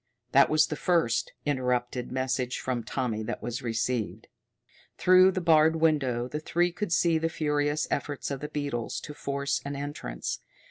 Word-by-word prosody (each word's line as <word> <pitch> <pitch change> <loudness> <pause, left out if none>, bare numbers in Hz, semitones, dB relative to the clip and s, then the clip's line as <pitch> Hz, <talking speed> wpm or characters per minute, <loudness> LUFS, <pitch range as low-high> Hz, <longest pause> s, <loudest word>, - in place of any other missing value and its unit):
That 140 - +6
was 155 -1 +4
the 150 - -4
first, 125 -9 +1
interrupted 125 -3 -1
message 130 -1 -1
from 125 -3 -2
Tommy 115 -1 -2
that 115 +2 -5
was 120 +1 -3
received. 115 -1 -2 0.7
Through 185 +1 +6
the 185 - -2
barred 160 -1 +5
window 140 -7 +1
the 150 +4 -4
three 175 +3 +1
could 180 +1 -4
see 170 -1 +3
the 165 +1 0
furious 150 -1 0
efforts 145 0 -2
of 140 - -3
the 150 - -5
beetles 145 -6 -3
to 150 - -8
force 140 -1 -2
an 140 0 -4
entrance. 140 - -4
140 Hz, 165 wpm, -28 LUFS, 125-155 Hz, 0.7 s, That